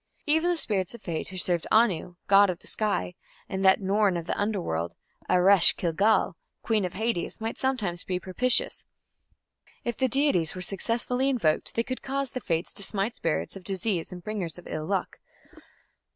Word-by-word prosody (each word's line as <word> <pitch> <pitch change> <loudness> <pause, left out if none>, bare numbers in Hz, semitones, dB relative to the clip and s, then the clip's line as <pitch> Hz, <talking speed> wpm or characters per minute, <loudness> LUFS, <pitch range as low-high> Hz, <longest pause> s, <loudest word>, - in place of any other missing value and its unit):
Even 320 +3 +3
the 350 - +2
spirits 205 - -1
of 235 - -14
Fate 165 -3 -4
who 185 - -8
served 175 -2 0
Anu, 195 -6 +2
god 200 0 +6
of 180 - -2
the - - -20
sky, 200 - 0 0.3
and 190 0 -3
that 190 0 +6
"Norn" 195 -1 +2
of 170 - -5
the - - -2
Underworld, 175 - -2 0.3
Eresh 185 0 +6
ki 170 - -1
gal, 205 -1 +2 0.3
queen 215 -4 +1
of 180 - -5
Hades, 220 -3 -2
might 225 +1 -3
sometimes 215 -11 -1
be 180 -1 -2
propitious: 250 - +2 1.0
if 240 -1 -2
the 260 - +1
deities 255 - +2
were 185 - -6
successfully 240 +7 -1
invoked 170 - 0
they 230 - +1
could 255 +2 -5
cause 275 -1 -2
the 255 - -5
Fates 165 0 -1
to - - -1
smite 200 +3 -1
spirits 165 -1 -2
of 195 - -10
disease 190 -1 -2
and 180 -1 -9
bringers 200 -7 -4
of 175 - -13
ill 155 0 -5
luck. 195 -1 -2
195 Hz, 180 wpm, -27 LUFS, 175-230 Hz, 1.0 s, god